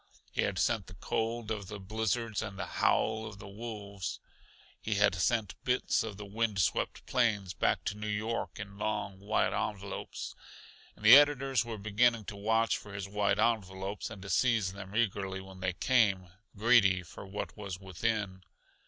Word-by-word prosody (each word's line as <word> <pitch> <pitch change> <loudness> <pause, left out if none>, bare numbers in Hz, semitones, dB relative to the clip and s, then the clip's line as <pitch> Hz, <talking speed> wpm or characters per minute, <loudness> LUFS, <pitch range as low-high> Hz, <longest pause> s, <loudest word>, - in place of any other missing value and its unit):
He - - 0
had 100 - 0
sent 105 0 +1
the 95 - -11
cold 115 +4 -2
of 100 -3 -3
the 105 0 -7
blizzards 110 +2 -1
and 105 -3 -6
the 90 - -3
howl 110 0 +1
of 105 -3 -9
the 100 - -10
wolves; 100 -3 -6 0.6
he 105 - -1
had 100 -1 +4
sent 105 +3 +1
bits 125 0 +2
of 105 -3 -5
the 105 - -7
wind 110 0 -1
swept 85 - 0
plains 105 -7 +1
back - - +1
to - - -2
New 105 0 -5
York 110 +2 -2
in 100 0 -8
long, 105 -2 -2
white 105 +2 +1
envelopes. 100 -1 -4 0.6
And 105 - -10
the 115 +4 +12
editors 135 -4 +5
were 115 -2 -5
beginning 110 +2 +2
to 100 - -6
watch 110 +3 +2
for 105 -1 -10
his 100 -1 -4
white 100 0 +1
envelopes 100 -3 -1
and 95 - -9
to 100 - -7
seize 110 -4 +2
them 100 0 -9
eagerly 100 -4 0
when 95 0 -11
they 95 0 -1
came, 100 -5 +2 0.3
greedy 100 -5 +5
for 90 - -10
what 100 +2 -5
was 100 -4 -6
within. 95 0 -2
105 Hz, 175 wpm, -31 LUFS, 95-110 Hz, 0.6 s, the